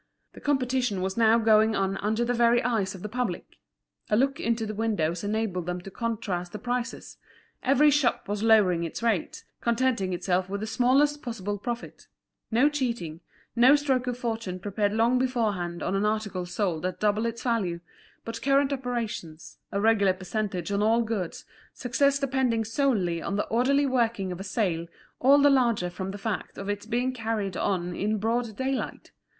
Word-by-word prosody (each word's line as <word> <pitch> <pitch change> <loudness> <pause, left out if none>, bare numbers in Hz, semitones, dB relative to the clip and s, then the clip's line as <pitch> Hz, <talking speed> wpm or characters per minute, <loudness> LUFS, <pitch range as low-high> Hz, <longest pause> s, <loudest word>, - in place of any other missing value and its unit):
The - - -13
competition 255 -8 0
was 190 0 -2
now 230 0 +5
going 220 -1 +4
on 195 0 0
under 220 +4 0
the 245 - 0
very 235 0 +3
eyes 215 -5 0
of 180 - -10
the - - -3
public; 230 -5 -4 0.5
a 210 - +3
look 275 +3 +1
into 230 -1 0
the 215 - -4
windows 200 -6 -1
enabled 205 -4 -2
them 180 0 -2
to 195 - -10
contrast 200 -6 -3
the - - -4
prices; 245 +1 -4 0.4
every 280 +3 +4
shop 280 -6 +1
was 205 0 -2
lowering 205 -6 +4
its 165 +7 -5
rates, 220 -7 -1 0.2
contenting 235 -5 +1
itself 180 +1 0
with 200 +1 -3
the - - -2
smallest 270 +6 +2
possible 205 -4 -4
profit; 240 +3 -6 0.4
no 245 +5 +4
cheating, 235 - -2 0.4
no 250 +4 +7
stroke 265 -4 0
of 245 -1 -2
fortune 225 -6 -3
prepared 205 +2 -1
long 230 +4 +2
beforehand 210 -9 -1
on - - -1
an 195 +1 +1
article 205 -4 -2
sold 175 -3 -2
at 185 0 -3
double 210 +2 +1
its 230 0 -5
value, 205 -9 0 0.5
but 230 0 -5
current 275 0 +3
operations, 230 - -5
a 200 - -1
regular 205 -3 +4
percentage 185 -1 -3
on 200 0 +1
all 225 +2 +3
goods, 215 -6 -4 0.3
success 280 +3 +2
depending 260 -5 0
solely 210 -9 0
on 200 - -3
the 205 - 0
orderly 270 +5 +3
working 230 -7 0
of 180 - -6
a - - -5
sale 180 -5 -1 0.3
all 275 +3 +6
the 285 0 +5
larger 235 -9 +2
from 190 +2 -5
the 200 - -5
fact 205 0 -4
of 195 +1 -5
its 205 0 -3
being 250 +2 0
carried 220 -5 -2
on 180 -3 -1
in 215 +2 0
broad 225 0 -1
daylight. 265 0 -3
220 Hz, 180 wpm, -27 LUFS, 195-245 Hz, 0.5 s, no